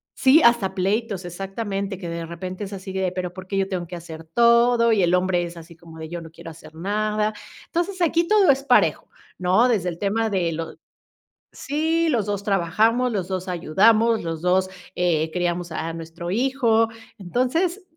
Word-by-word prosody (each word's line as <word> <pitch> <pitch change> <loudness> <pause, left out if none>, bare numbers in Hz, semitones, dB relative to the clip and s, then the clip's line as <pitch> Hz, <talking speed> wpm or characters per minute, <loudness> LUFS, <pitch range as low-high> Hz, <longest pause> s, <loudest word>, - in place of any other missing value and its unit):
Sí, 275 +4 +5
hasta 235 -5 +4
pleitos, 200 +1 -1
exactamente, 195 +2 -4
que 175 -2 -6
de 170 0 -4
repente 180 +4 -6
es 200 0 -7
así 190 0 -7
de: 190 -1 -1
"Pero 180 -1 -4
por 185 0 -10
qué 195 - -3
yo 195 0 +1
tengo 180 -2 -3
que 175 - -7
hacer 165 -2 -9
todo". 235 +5 +4
Y 210 -4 +3
el 175 0 +2
hombre 180 -1 +2
es 170 0 -7
así 170 0 -12
como 165 -1 -14
de: 160 0 -7
"Yo 170 0 -5
no 165 - -10
quiero 165 - -11
hacer 155 -1 -14
nada". 210 +4 -1 0.3
Entonces 360 +2 -2
aquí 335 0 +2
todo 415 -4 +4
es 270 0 -1
parejo, 260 -3 +3 0.3
¿no? 185 +7 +3
Desde 195 -7 +1
el 170 - -7
tema 220 +3 0
de 180 -5 0
lo 165 +1 -5 0.8
sí 320 +3 0
los 230 -7 0
2 205 -1 -2
trabajamos, 215 +6 +1
los 190 -4 -2
2 185 -1 -4
ayudamos, 215 +7 +3
los 165 -1 -4
2 185 +1 +2 0.3
eh, 160 -3 +1
criamos 175 -1 -2
a 160 +1 -3
nuestro 165 +1 -7
hijo, 230 0 +2 0.3
entonces 255 - -1
190 Hz, 185 wpm, -23 LUFS, 175-230 Hz, 0.8 s, Sí